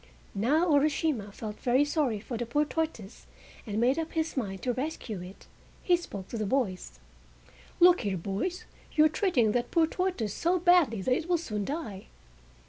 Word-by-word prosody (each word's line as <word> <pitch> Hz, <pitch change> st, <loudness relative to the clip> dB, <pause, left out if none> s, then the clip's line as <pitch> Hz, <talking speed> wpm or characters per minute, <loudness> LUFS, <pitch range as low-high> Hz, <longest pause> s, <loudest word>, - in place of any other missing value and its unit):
Now 275 Hz, -, +2 dB
Urashima 285 Hz, -6 st, +1 dB
felt 210 Hz, +1 st, -7 dB
very 255 Hz, +4 st, +3 dB
sorry 290 Hz, -8 st, 0 dB
for 235 Hz, +4 st, -6 dB
the 235 Hz, +1 st, -3 dB
poor 295 Hz, +6 st, +1 dB
tortoise 300 Hz, -11 st, -4 dB, 0.4 s
and 210 Hz, 0 st, -2 dB
made 255 Hz, +6 st, +3 dB
up 325 Hz, 0 st, -4 dB
his 320 Hz, 0 st, -1 dB
mind 195 Hz, -8 st, -3 dB
to 250 Hz, -, 0 dB
rescue 255 Hz, -, -4 dB
it. 180 Hz, +2 st, -11 dB, 0.4 s
He 355 Hz, -, +4 dB
spoke 200 Hz, -, -7 dB
to 230 Hz, -, -4 dB
the 215 Hz, -, -1 dB
boys: 190 Hz, -, -1 dB, 0.8 s
"Look 355 Hz, +1 st, +6 dB
here, 200 Hz, -4 st, -1 dB
boys, 200 Hz, -, -3 dB, 0.3 s
you 310 Hz, -, +5 dB
are -, -, +5 dB
treating 295 Hz, -, +2 dB
that 240 Hz, +2 st, -1 dB
poor 330 Hz, -2 st, +3 dB
tortoise 320 Hz, -, -2 dB
so 345 Hz, +8 st, +1 dB
badly 340 Hz, -, +3 dB
that 255 Hz, -, +2 dB
it 315 Hz, +6 st, -2 dB
will 350 Hz, -, +3 dB
soon 210 Hz, -11 st, -4 dB
die!" 220 Hz, -, -5 dB
255 Hz, 180 wpm, -29 LUFS, 210-320 Hz, 0.8 s, Look